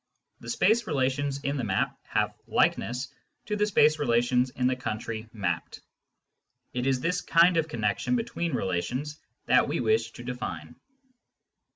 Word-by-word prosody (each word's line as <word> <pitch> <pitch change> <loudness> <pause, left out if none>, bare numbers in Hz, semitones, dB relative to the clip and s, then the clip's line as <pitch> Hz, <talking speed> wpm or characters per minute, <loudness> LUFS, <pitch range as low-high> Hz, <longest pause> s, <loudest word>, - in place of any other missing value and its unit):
The 115 - -9
space 220 - +2
relations 140 0 0
in 140 +1 -1
the 130 - -2
map 95 -4 0
have - - 0
" - - -38
likeness 125 +3 +1
" - - -49
to 210 - -2
the 210 0 +1
space 155 -6 +4
relations 125 -1 +2
in 125 0 -2
the 130 0 +3
country 110 -2 -5
mapped. 90 -7 -3 0.9
It 125 +1 -1
is 130 -2 +1
this 175 +3 0
kind 170 +1 +5
of 160 -1 +2
connection 120 - 0
between 225 -8 -2
relations 125 - -2 0.3
thaV - - +5
we - - -1
wish 440 +1 +2
to - - -10
define. - - -6
135 Hz, 160 wpm, -27 LUFS, 120-165 Hz, 0.9 s, kind